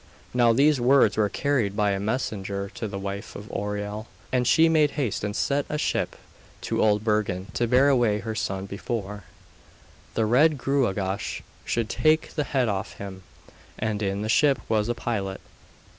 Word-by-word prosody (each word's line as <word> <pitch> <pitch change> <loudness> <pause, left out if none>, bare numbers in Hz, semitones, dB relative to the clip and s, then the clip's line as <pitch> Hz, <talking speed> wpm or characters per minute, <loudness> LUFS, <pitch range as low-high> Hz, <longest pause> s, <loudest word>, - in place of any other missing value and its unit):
Now 120 -1 +4
these 140 +3 +4
words 125 -4 +5
were 105 -2 +2
carried 120 -4 0
by 105 -1 +2
a 100 - -1
messenger 100 -3 -3
to 110 - -4
the 100 -1 -5
wife 100 +1 -5
of 100 +1 -8
Oireal, 105 +1 -4 0.2
and 125 -1 +1
she 165 +1 +5
made 155 -2 +4
haste 125 -9 -1
and 105 -1 -2
sent 140 0 0
a 150 - -1
ship 150 - -1 0.5
to - - -1
Old 105 -1 +3
Bergen 100 -4 -1
to 120 - 0
bear 130 +4 +5
away 120 -6 +3
her 110 +2 -4
son 95 -2 -3
before 100 0 -5 0.9
the 110 - +2
Red 145 +7 +4
Gruagach 105 -8 -1 0.2
should 115 -2 -1
take 155 +7 +2
the 150 -2 -1
head 130 -4 +1
off 100 -3 -2
him. 95 -2 -8 0.6
And 110 -1 -2
in 100 0 -1
the - - -2
ship 135 +3 +3
was 110 0 +1
a 120 - 0
pilot. 95 -5 -3
110 Hz, 175 wpm, -25 LUFS, 100-130 Hz, 0.9 s, words